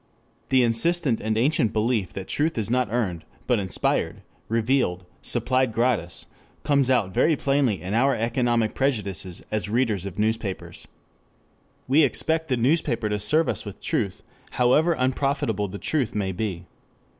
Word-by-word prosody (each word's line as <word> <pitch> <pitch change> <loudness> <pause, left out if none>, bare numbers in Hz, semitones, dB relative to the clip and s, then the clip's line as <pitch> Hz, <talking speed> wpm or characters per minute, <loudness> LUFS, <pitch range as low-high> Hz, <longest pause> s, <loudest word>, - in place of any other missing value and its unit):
2 130 - +3
This 125 - +5
insistent 125 +2 +2
and 110 +1 -1
ancient 125 -2 +2
belief 110 -3 0
that 95 -1 -6
truth 155 0 0
is 110 0 -2
not 125 -4 +1
earned, 95 -9 -1 0.2
but 120 -3 +2
inspired, 95 -3 -1 0.3
revealed, 115 -6 0 0.2
supplied 130 -1 +1
gratis, 110 -6 -1 0.4
comes 140 -3 +2
out 110 -8 +1
very 160 - +3
plainly 135 -7 +1
in 95 +3 -4
our 135 +5 +3
economic 120 -1 0
prejudices 100 -9 -2
as 105 -1 -2
readers 110 -5 0
of 100 -2 -7
newspapers. 110 -2 -3 1.0
We 140 +5 +5
expect 160 +3 +1
the 130 -4 0
newspaper 120 -4 +1
to 105 0 -1
serve 150 +11 +3
us - - -2
with 105 -3 -9
truth 100 -4 -2 0.3
however 150 +7 +3
unprofitable 130 -5 0
the 100 +2 -7
truth 135 -1 -1
may 100 -2 -1
be. 95 -2 -4
115 Hz, 150 wpm, -24 LUFS, 105-135 Hz, 1.0 s, This